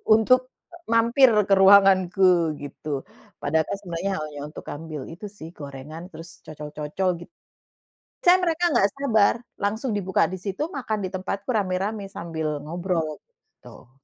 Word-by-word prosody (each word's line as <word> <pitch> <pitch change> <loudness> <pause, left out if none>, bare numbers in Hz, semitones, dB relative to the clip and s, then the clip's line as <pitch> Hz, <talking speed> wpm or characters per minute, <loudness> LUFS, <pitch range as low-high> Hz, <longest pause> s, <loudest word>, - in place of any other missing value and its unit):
untuk 255 +4 +4 0.4
mampir 235 +3 +5 0.2
ke - - +5
ruanganku 190 -3 +5
gitu, 145 0 -5 0.4
padahal 160 +2 +1
kan 200 - -4
sebenarnya 180 +1 -3
hanya 150 -1 -7
untuk 150 - -9
ngambil 155 -1 -6
itu 170 +6 -9
sih, 195 -6 -9
gorengan 145 +3 -8
terus 165 +2 -10 0.2
cocol-cocol 150 +4 -3 0.2
git - - -35 0.9
saya 365 +1 +5
mereka 345 0 +1
enggak 235 - +3
sabar 220 -8 +3 0.3
langsung 220 +3 -1
dibuka 190 -2 +1
disitu, 190 - -4
makan 220 -6 -2
ditempatku 190 +1 -4
rame-rame 200 +1 -1
sambil 160 -4 -4
ngobrol, 170 0 -2 0.2
gitu. - - -18
185 Hz, 130 wpm, -24 LUFS, 160-210 Hz, 0.9 s, mampir